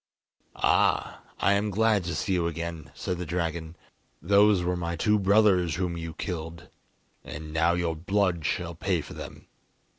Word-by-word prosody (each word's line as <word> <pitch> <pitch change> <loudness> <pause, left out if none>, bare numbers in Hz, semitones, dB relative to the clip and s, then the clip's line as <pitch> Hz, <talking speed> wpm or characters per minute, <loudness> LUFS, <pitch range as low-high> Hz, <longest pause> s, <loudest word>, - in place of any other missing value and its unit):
"Ah, - - +1 0.2
I 100 - +3
am 100 +1 +1
glad 105 -1 +2
to 85 -2 -3
see 95 - -1
you 85 -2 +1
again," 85 -2 -5
said 90 -1 -3
the - - -2
dragon. 85 -1 -3 0.4
"Those 100 +2 +4
were 90 +1 0
my 85 -1 -3
two 105 +5 +2
brothers 95 -4 +3
whom 90 -1 -2
you 80 -1 -6
killed, 85 -3 -6 0.5
and 75 +1 -8
now 80 +2 +3
your 85 -2 -1
blood 90 0 0
shall 85 +3 -2
pay 85 0 -1
for 70 - -10
them." - - -9
85 Hz, 160 wpm, -27 LUFS, 80-95 Hz, 0.5 s, Those